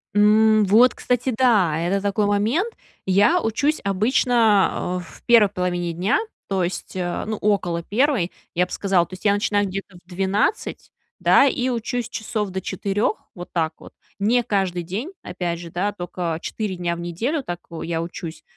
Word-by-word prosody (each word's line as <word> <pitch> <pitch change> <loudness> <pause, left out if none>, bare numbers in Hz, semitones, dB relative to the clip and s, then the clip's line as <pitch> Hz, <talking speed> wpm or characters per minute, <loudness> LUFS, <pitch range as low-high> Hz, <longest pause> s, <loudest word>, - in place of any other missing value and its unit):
М, 215 +1 +5
вот, 230 +6 +5
кстати, 250 0 -1
да! 195 -11 +3
Это 185 +4 0
такой 205 +1 +1
момент. 230 - +1 0.3
Я 205 - +4
учусь 280 +7 0
обычно, 210 -3 +2
э, - - -10
в - - -15
1 225 -4 +6
половине 175 -2 -2
дня, 185 - +1 0.3
то 190 -2 0
есть, 180 +1 -4
э, 175 -1 -2
ну, 215 -1 -3
около 180 -5 0
1, 225 - +1 0.2
я 180 +1 +2
б - - -19
сказала, 190 -4 +1
то - - -15
есть 185 - -10
я 200 - +5
начинаю 205 -1 +1
где-то 195 0 -6
в 175 0 -22
12, 195 - -1 0.3
да, - - +5
и 255 -1 0
учусь 240 0 -2
часов 215 -2 -3
до 190 0 -3
4, 200 +3 -1 0.2
вот 175 0 -9
так 160 -2 0
вот. - - -13 0.3
Не 235 +4 +2
каждый 190 -5 -1
день, 215 - -4
опять 175 -1 -3
же, 170 -1 -9
да, 190 +3 -1
только 175 -3 -4
4 210 -4 -3
дня 175 -1 -2
в - - -8
неделю 225 - -2
так, 175 -4 -5
о, 165 - -6
я 165 -1 -2
учусь. 170 -1 -7
200 Hz, 180 wpm, -22 LUFS, 175-220 Hz, 0.3 s, 1